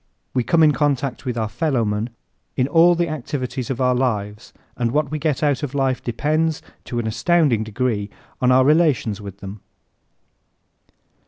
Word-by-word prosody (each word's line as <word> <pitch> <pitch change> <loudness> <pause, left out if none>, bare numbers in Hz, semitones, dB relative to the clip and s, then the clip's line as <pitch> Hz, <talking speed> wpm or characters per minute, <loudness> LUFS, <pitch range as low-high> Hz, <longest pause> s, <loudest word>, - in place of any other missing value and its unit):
We 125 - +1
come 165 +4 +3
in 155 - +6
contact 140 -2 -1
with 125 -2 -3
our 110 -1 0
fellowman 110 -4 -1 0.5
in 125 - +2
all 170 +4 +5
the 170 0 0
activities 130 -4 -4
of 135 -2 -3
our 125 -1 +3
lives 105 -4 -2 0.2
and 120 -1 0
what 150 +3 0
we 155 - -2
get 150 -1 -1
out 145 -2 +1
of 145 -2 -4
life 135 -2 0
depends, 155 +6 0 0.3
to 120 - -5
an 120 - -1
astounding 120 +1 +2
degree, 110 -1 -2 0.3
on 125 0 +4
our 130 +1 +5
relations 145 - +2
with 100 -1 -10
him. 100 +1 -8
130 Hz, 165 wpm, -21 LUFS, 115-150 Hz, 0.5 s, in